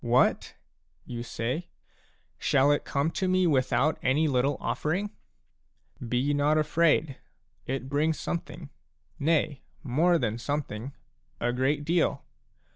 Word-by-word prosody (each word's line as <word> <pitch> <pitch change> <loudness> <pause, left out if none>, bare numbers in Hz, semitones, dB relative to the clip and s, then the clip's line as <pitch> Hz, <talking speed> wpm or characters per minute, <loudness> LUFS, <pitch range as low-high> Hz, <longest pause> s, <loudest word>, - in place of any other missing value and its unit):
" - - -27
What? - - +2 0.2
" - - -43
you 120 - -4
say; 125 +7 -3 0.3
" - - -34 0.3
shall 140 +1 +3
it 145 - +1
come 145 +3 0
to 190 - -1
me 185 0 +3
without 140 0 +2
any 145 +5 +2
little 135 0 +1
offering? 190 +7 -1 0.5
" 120 - -14
Be 130 +4 +1
not 145 +2 +2
afraid; 155 -2 +2 0.5
it 130 0 -3
brings 150 +3 0
something, 165 -3 -5 0.2
— - - -39
nay, 150 -3 +1 0.2
more 160 +7 +3
than 115 -5 -2
something, 135 -2 -4 0.5
a 120 +1 0
great 140 +4 0
deal. 170 +2 +1
145 Hz, 140 wpm, -28 LUFS, 130-160 Hz, 0.5 s, shall